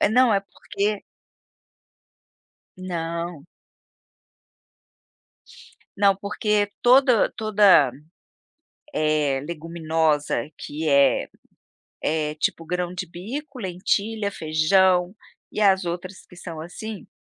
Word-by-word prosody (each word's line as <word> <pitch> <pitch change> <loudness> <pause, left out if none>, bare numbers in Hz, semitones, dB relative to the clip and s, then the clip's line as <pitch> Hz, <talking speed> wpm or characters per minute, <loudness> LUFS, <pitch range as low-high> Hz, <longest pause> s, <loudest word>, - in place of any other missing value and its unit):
É, - - +4
não, 245 +2 +4
é 195 - +3
porque 200 +1 -3 1.7
Não. 170 -3 -4 2.5
Não, 200 -1 +4
porque 205 +1 0
todo 250 -2 +5
toda, 205 - +5 1.0
eh, 150 -3 +1
leguminosa 160 -4 -1
que 155 +2 -4
é 140 -2 +4 0.7
é 155 -1 -1
tipo 165 +1 -2
grão 180 +1 -2
de 180 +1 -4
bico, 255 - -7
lentilha, 200 +3 -1
feijão 180 +4 +2 0.4
e - - -4
as 190 -2 +4
outras 180 +2 -6
que - - -16
são 165 -2 -8
assim, 205 +5 -8
180 Hz, 90 wpm, -23 LUFS, 160-205 Hz, 2.5 s, todo